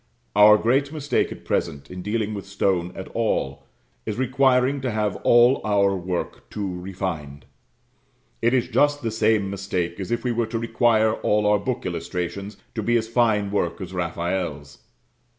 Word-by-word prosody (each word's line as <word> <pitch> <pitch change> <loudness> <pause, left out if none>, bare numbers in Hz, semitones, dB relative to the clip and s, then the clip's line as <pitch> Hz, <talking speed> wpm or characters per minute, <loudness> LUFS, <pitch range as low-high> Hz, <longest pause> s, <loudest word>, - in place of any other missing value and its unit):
Our 105 +1 +8
great 135 +6 +1
mistake 150 -2 0
at - - -10
present, 70 +1 -2
in 90 0 -6
dealing 110 +2 -2
with 100 -2 -6
stone 95 -3 0
at 95 - -7
all, 110 -12 -2 0.4
is 105 - -4
requiring 130 +1 +2
to 130 - -1
have 105 -3 -1
all 120 +3 +5
our 100 -2 +2
work 90 -1 -4
too 95 -4 -4
refined; 85 -7 -5 1.0
it 120 - +3
is 125 - +1
just 145 +4 +2
the 115 - -1
same 110 -2 +1
mistake 95 -3 -3
as 95 - -5
if 120 - -1
we 125 - 0
were 115 -1 0
to 115 +1 -3
require 115 -1 +2
all 105 -1 +1
our 105 0 +4
book 100 - -3
illustrations 100 +3 -4 0.2
to 110 - -3
be 120 +3 +2
as 110 -1 -2
fine 110 -4 +2
work 90 -4 -1
as 95 -1 -7
Raphael's. 85 -4 -3
105 Hz, 170 wpm, -23 LUFS, 95-115 Hz, 1.0 s, Our